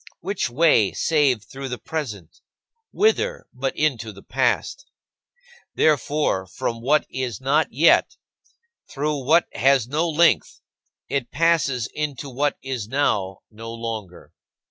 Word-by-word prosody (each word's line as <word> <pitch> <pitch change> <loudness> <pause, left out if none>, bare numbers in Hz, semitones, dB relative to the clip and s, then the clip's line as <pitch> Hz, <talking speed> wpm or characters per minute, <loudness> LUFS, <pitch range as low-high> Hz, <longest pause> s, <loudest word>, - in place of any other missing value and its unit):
Which 195 -6 -2
way, 120 - +3
save 145 - +2
through 135 +5 -8
the 125 - -4
present? 110 - -6 0.5
Whither, 465 +3 +1
but 135 +1 -3
into 120 -8 0
the 100 -1 -14
past? - - -1 0.9
Therefore, 145 -10 +1
from 115 +5 -4
what 145 +5 +2
is 125 -5 -3
not 145 +4 +2
yet, 155 +7 +4 0.7
through 145 -1 -2
what 160 +6 +4
has 135 -2 +3
no 155 +6 0
length, 170 +2 +2 0.5
it 135 -4 -2
passes 160 -7 +1
into 145 -2 -4
what 145 +3 0
is 130 -6 -4
now 105 -7 0
no 115 +1 -8
longer. 115 -6 -7
135 Hz, 120 wpm, -23 LUFS, 115-150 Hz, 0.9 s, yet